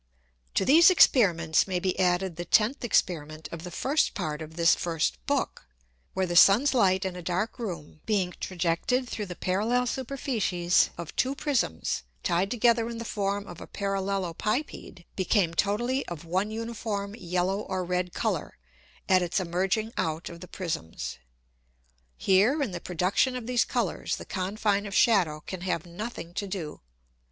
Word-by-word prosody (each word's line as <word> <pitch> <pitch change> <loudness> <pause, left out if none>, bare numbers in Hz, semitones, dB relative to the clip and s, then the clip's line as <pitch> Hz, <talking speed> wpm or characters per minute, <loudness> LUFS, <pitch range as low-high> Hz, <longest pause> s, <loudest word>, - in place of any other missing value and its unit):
To 190 - +2
these 330 +6 +8
Experiments 180 - +4
may 185 -2 -1
be 185 +1 -1
added 180 -1 +1
the 175 - -4
tenth 220 +10 +2
Experiment 155 -8 0
of 170 -1 -7
the 180 - -6
first 275 - 0
Part 150 0 -3
of 160 0 -8
this 170 0 +5
first 155 - -1
Book, 60 - -1 0.5
where 190 - +1
the 175 -1 -3
Sun's 220 +11 +7
Light 190 -5 +3
in 185 -1 -3
a 180 - -6
dark 185 +8 -2
Room 170 -8 -6
being 190 -5 +1
trajected 185 +8 0
through 210 -4 -4
the 180 - -6
parallel 220 +9 0
Superficies 235 -9 +1
of 170 -2 -7
two 265 +2 +1
Prisms 265 - -1 0.2
tied 185 +3 +1
together 235 0 +2
in 235 - -5
the 230 - -5
form 200 -1 -2
of 175 -3 -10
a - - -8
Parallelopipede, 195 - -3
became 185 -2 +1
totally 235 - 0
of 170 -2 -7
one 185 +5 0
uniform 220 -2 -4
yellow 180 0 -1
or 185 -3 -3
red 180 0 -1
Colour, - - -2 0.5
at 185 -1 +5
its 175 +2 0
emerging 190 +5 -1
out 160 +1 -2
of 170 0 -11
the 180 - -9
Prisms. 160 - -5 1.0
Here, 205 +10 +3
in 240 - -3
the 175 -1 -5
production 185 +9 +1
of 250 -3 -5
these 245 0 +2
Colours, - - -1
the - - -9
Confine 200 +2 -1
of 200 - -5
Shadow 175 -10 +3
can 185 +2 -7
have 180 -3 -2
nothing 175 -1 -7
to 200 - -3
do. 180 -6 -5
190 Hz, 165 wpm, -27 LUFS, 175-220 Hz, 1.0 s, these